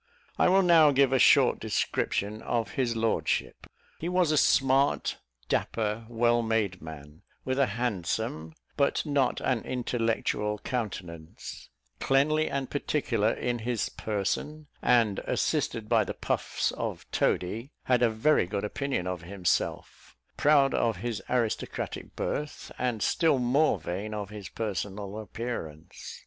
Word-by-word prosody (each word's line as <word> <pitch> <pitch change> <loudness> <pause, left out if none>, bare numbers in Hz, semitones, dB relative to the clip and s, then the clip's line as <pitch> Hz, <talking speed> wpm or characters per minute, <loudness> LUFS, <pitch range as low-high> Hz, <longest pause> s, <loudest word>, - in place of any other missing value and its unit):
I - - +5
will 190 +1 +5
now 165 -4 +7
give 135 -1 +3
a 130 - +4
short - - +5
description 105 +2 -1
of 115 -2 -1
his 120 -3 0
lordship. 80 - -1 0.3
He 170 - -3
was 180 -3 +2
a - - +2
smart, 135 -1 +3 0.3
dapper, 110 - -1
well 120 0 +2
made 110 -5 0
man, 75 -1 -10 0.2
with 130 +1 -1
a 140 - +4
handsome, 100 -6 -2 0.2
but 140 +3 +1
not 140 -3 +1
an 125 -3 0
intellectual 115 -4 -1
countenance; 90 -10 -6 0.3
cleanly 155 +3 +2
and 135 -1 -2
particular 120 -7 0
in 120 -1 -2
his 115 0 -1
person; 110 +9 -3 0.2
and, 115 -5 +3
assisted 110 -2 -1
by 115 -1 +4
the - - -5
puffs - - -1
of - - -4
Toady, 110 +10 0
had 125 -1 +2
a 120 - +5
very 110 -1 +2
good 100 +1 -3
opinion 130 -2 -2
of 90 -2 -3
himself; 90 0 -2 0.2
proud 140 -2 +4
of 115 -2 +1
his 115 -3 -2
aristocratic 120 -3 -2
birth, 150 0 -4
and 120 -4 -1
still 160 -5 +3
more 130 +1 +2
vain 100 +6 -4
of 105 -1 -5
his 105 -3 -8
personal 100 0 -4
appearance. 100 -8 -7
115 Hz, 135 wpm, -28 LUFS, 100-135 Hz, 0.3 s, now